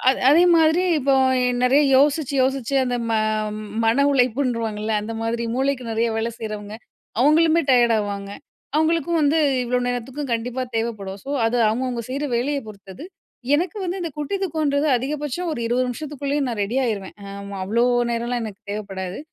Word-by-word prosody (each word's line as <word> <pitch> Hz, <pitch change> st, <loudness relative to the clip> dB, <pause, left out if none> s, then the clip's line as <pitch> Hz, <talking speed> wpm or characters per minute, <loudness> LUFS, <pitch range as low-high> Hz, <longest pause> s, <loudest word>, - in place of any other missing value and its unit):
அ 255 Hz, -, +7 dB, 0.2 s
அதே 315 Hz, +5 st, +6 dB
மாதிரி 320 Hz, +2 st, +4 dB, 0.2 s
இப்போ 275 Hz, -1 st, +2 dB, 0.3 s
எ -, -, +2 dB, 0.2 s
நெறைய 265 Hz, +4 st, +4 dB
யோசிச்சு, 285 Hz, 0 st, +2 dB
யோசிச்சு 265 Hz, 0 st, -1 dB
அந்த 245 Hz, -1 st, -1 dB
ம -, -, +1 dB, 0.7 s
மன 235 Hz, +5 st, +3 dB
உழைப்புன்றுவாங்கல்ல, 230 Hz, -4 st, 0 dB
அந்த 220 Hz, +2 st, -5 dB
மாதிரி 230 Hz, +1 st, -2 dB
மூளைக்கு 265 Hz, -1 st, 0 dB
நெறைய 225 Hz, +1 st, +1 dB
வேலை 225 Hz, +1 st, -1 dB
செய்றவங்க, 210 Hz, -1 st, -6 dB, 0.5 s
அவுங்களுமே 320 Hz, +4 st, +4 dB
டயர்ட் 240 Hz, -2 st, +5 dB
ஆவாங்க. 200 Hz, -1 st, -4 dB, 0.5 s
அவுங்களுக்கும் 330 Hz, +1 st, +1 dB
வந்து 300 Hz, +2 st, +3 dB, 0.3 s
இவ்ளோ 250 Hz, +1 st, 0 dB
நேரத்துக்கும் 250 Hz, +3 st, -4 dB
கண்டிப்பா 240 Hz, +2 st, -2 dB
தேவைப்படும். 210 Hz, -4 st, -3 dB
சோ, 275 Hz, -, -10 dB, 0.2 s
அது 235 Hz, +2 st, 0 dB
அவுங்கவுங்க 245 Hz, +2 st, -1 dB
செய்ற 280 Hz, +3 st, -2 dB
வேலைய 280 Hz, +4 st, -1 dB
பொறுத்தது. 200 Hz, -, -11 dB, 0.5 s
எனக்கு 340 Hz, +5 st, 0 dB
வந்து 360 Hz, +2 st, -3 dB
இந்த 335 Hz, -, -3 dB
குட்டி 295 Hz, +7 st, -2 dB
தூக்கன்றது 305 Hz, -4 st, 0 dB
அதிகபட்சம் 295 Hz, +6 st, -3 dB
ஒரு 265 Hz, -, -4 dB
20 245 Hz, +2 st, +1 dB
நிமிஷத்துக்குள்ளேயும் 285 Hz, +1 st, -3 dB
நான் 230 Hz, -3 st, -4 dB
ரெடி 230 Hz, +6 st, -4 dB
ஆயிருவேன். 205 Hz, -5 st, -3 dB, 0.2 s
ஆமா, 200 Hz, 0 st, -7 dB
அவ்ளோ 230 Hz, +5 st, +1 dB, 0.3 s
நேரலாம் 235 Hz, +1 st, -2 dB
எனக்கு 205 Hz, -2 st, -8 dB
தேவப்படாது. 195 Hz, -3 st, -5 dB
250 Hz, 155 wpm, -22 LUFS, 225-290 Hz, 0.7 s, அ